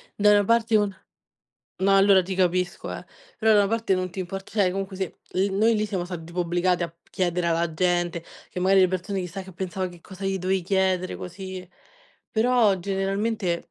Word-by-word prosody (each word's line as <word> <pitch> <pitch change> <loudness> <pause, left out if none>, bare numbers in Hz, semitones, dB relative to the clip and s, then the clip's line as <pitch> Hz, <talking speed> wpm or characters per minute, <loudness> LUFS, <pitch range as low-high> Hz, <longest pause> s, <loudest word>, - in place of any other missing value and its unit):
da 210 0 +5
una 205 -1 +4
parte 230 +1 +3
un 205 -2 0 0.9
No, 195 +1 +4
allora, 195 -1 +6
ti 190 +1 -4
capisco, 180 -1 0
eh. - - -7 0.4
Però, 220 0 +4
da 205 - +6
una 200 - +3
parte 225 -3 +1
non 185 0 -2
ti 180 - -10
import 190 +1 -5
cioè, 200 -4 +2
comunque, 195 +1 -4
sì, 190 0 -1 0.3
l 195 +1 +2
noi 220 +3 +3
lì 215 0 0
siamo 190 -4 -2
stati 175 -2 -7
tipo 170 +2 -4
obbligati 175 +1 +1
a 170 - -1
p 170 +1 -34
chiedere 180 -1 0
alla 170 0 0
gente 175 0 0 0.3
che, 180 - -5
magari, 190 +1 +5
le 185 - +4
persone 185 +2 -2
chissà 185 +2 -5
che 190 0 -12
pensava 185 0 -3
che 175 -1 -14
cosa 195 0 -7
gli 195 - 0
dovevi 190 +1 0
chiedere, 185 0 0
così 185 0 -7 0.6
Però, 225 -3 +3
generalmente 195 0 -2
190 Hz, 200 wpm, -25 LUFS, 180-200 Hz, 0.9 s, allora